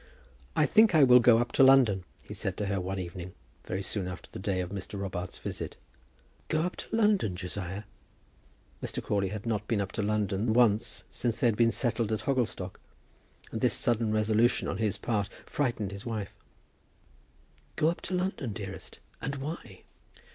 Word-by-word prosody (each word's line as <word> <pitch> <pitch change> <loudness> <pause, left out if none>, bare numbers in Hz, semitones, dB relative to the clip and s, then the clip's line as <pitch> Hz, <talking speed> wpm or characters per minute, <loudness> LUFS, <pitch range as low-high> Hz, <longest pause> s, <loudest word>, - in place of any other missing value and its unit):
"I 155 - +4
think 215 -1 +5
I 155 - +7
will 125 -1 +8
go 120 -1 +6
up 120 +1 0
to 135 - +5
London," 125 -9 +6 0.2
he - - -9
said - - -3
to 105 - -1
her 100 -1 -1
one 95 +2 -3
evening, 90 0 -6 0.3
very 95 +2 -3
soon 95 -1 0
after 90 0 -8
the - - -7
day 95 -1 -1
of 90 0 -3
Mr. 100 +1 -5
Robarts's 90 -2 -4
visit. - - -5 0.7
"Go 155 - +1
up 180 - -2
to - - -4
London, 210 - +2
Josiah!" 95 +2 -5 1.0
Mr. - - -3
Crawley 100 -2 0
had 105 +3 -6
not 105 -2 -1
been 115 -3 +1
up 100 -1 -2
to 110 - -2
London 105 +1 0
once 110 -3 +3
since 115 -2 -1
they - - +1
had 115 -3 +4
been 115 +1 +4
settled 115 -2 +1
at 110 - 0
Hogglestock, 120 -9 -1 0.7
and - - -4
this - - +3
sudden 115 -2 +1
resolution 110 +2 +2
on - - -3
his 110 -3 0
part 105 -3 -1 0.2
frightened 120 -8 -1
his 100 0 -8
wife. 110 -4 -4 1.4
"Go 155 0 +3
up 175 - -8
to 185 - -3
London, 180 - -2
dearest! 100 -2 -7 0.2
and 140 - -3
why?" 135 - -7
110 Hz, 180 wpm, -29 LUFS, 100-125 Hz, 1.4 s, will